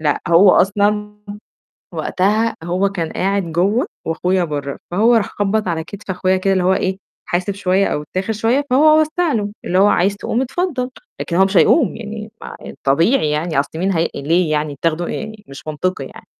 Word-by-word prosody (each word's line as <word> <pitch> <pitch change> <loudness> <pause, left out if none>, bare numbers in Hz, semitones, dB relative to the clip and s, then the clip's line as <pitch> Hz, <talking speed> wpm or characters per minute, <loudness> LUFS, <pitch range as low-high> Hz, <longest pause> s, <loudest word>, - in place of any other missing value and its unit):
لأ، 150 -2 0
هو 175 +3 +6
أصلًا 210 +2 +1 0.8
وقتها 215 +5 0
هو 185 +3 0
كان 170 -5 -3
قاعد 195 -2 -1
جوّه، 200 - +1 0.2
وأخويا 180 +3 0
برّه، 145 -3 -4
فهو 225 +6 +4
راح 220 -3 +2
خبَّط 205 +1 -1
على 165 -2 -1
كتف 205 +4 -12
أخويا 185 0 +1
كده، 195 +1 +1
اللي 185 -1 +1
هو 185 - +3
إيه 190 0 -1 0.3
حاسب 180 +3 -1
شوية 195 0 +1
أو 150 - -2
اتّاخر 185 +8 -3
شوية، 235 +6 +1
فهو 310 +4 +5
وسَّع 315 +1 0
له، 205 -2 -1
اللي 180 - 0
هو 200 - +6
عايز 200 0 +2
تقوم 235 +4 -1
اتفضل، 265 -2 -2 0.3
لكن 170 - -3
هو 190 +2 +5
مش 195 0 0
هيقوم، 255 - +4
يعني 215 -1 -7
ما - - -8
الطبيعي 155 - +1
يعني، 150 -1 0
أصل 140 - -1
مين 190 +2 +1
هي 165 0 +1
ليه 160 +3 +1
يعني 150 -2 -1
تاخده 165 +1 0
يعني 220 -1 -6
مش 135 +3 -12
منطقي 155 -1 -2
يعني، - - -13
190 Hz, 185 wpm, -18 LUFS, 170-215 Hz, 0.8 s, هو